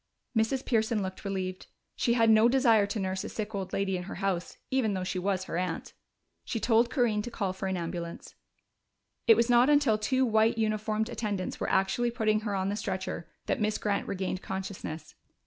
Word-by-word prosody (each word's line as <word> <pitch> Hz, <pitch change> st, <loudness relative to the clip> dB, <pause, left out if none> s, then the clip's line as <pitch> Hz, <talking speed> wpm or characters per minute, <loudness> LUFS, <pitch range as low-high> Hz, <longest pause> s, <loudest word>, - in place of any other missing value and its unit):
Mrs. 225 Hz, +4 st, +1 dB
Pearson 220 Hz, -2 st, +1 dB
looked 190 Hz, 0 st, -6 dB
relieved: 185 Hz, -2 st, -4 dB, 0.3 s
she 235 Hz, -, +2 dB
had 225 Hz, -2 st, +5 dB
no 220 Hz, +2 st, +6 dB
desire 235 Hz, -5 st, +4 dB
to 210 Hz, +2 st, -3 dB
nurse 190 Hz, -1 st, -2 dB
a -, -, -5 dB
sick 215 Hz, 0 st, -5 dB
old 195 Hz, -2 st, -4 dB
lady 195 Hz, -1 st, 0 dB
in 180 Hz, -, -6 dB
her -, -, -7 dB
house, 190 Hz, -2 st, -2 dB
even 235 Hz, -6 st, +1 dB
though 185 Hz, -, -2 dB
she 185 Hz, 0 st, -2 dB
was 190 Hz, 0 st, 0 dB
her 170 Hz, -, -4 dB
aunt. 180 Hz, -3 st, -3 dB, 0.5 s
She 230 Hz, -, -3 dB
told 230 Hz, +1 st, +3 dB
Corinne 235 Hz, -6 st, +1 dB
to 240 Hz, -, -5 dB
call 200 Hz, -5 st, -2 dB
for 190 Hz, +1 st, -4 dB
an 190 Hz, -1 st, -1 dB
ambulance. 170 Hz, 0 st, -5 dB, 0.9 s
It 225 Hz, -, +9 dB
was 235 Hz, +1 st, +2 dB
not 245 Hz, +2 st, +5 dB
until 285 Hz, -7 st, +4 dB
two 260 Hz, +5 st, +2 dB
white 220 Hz, 0 st, +3 dB
uniformed 215 Hz, 0 st, 0 dB
attendants 205 Hz, -6 st, -3 dB
were -, -, -1 dB
actually 195 Hz, +6 st, +2 dB
putting 220 Hz, -3 st, +1 dB
her 210 Hz, -2 st, -3 dB
on 190 Hz, 0 st, 0 dB
the 205 Hz, -, -1 dB
stretcher 190 Hz, -4 st, -4 dB, 0.2 s
that -, -, -1 dB
Miss 215 Hz, 0 st, +1 dB
Grant 205 Hz, -1 st, -1 dB
regained 190 Hz, -1 st, -3 dB
consciousness. 185 Hz, -5 st, -6 dB
210 Hz, 200 wpm, -29 LUFS, 190-225 Hz, 0.9 s, It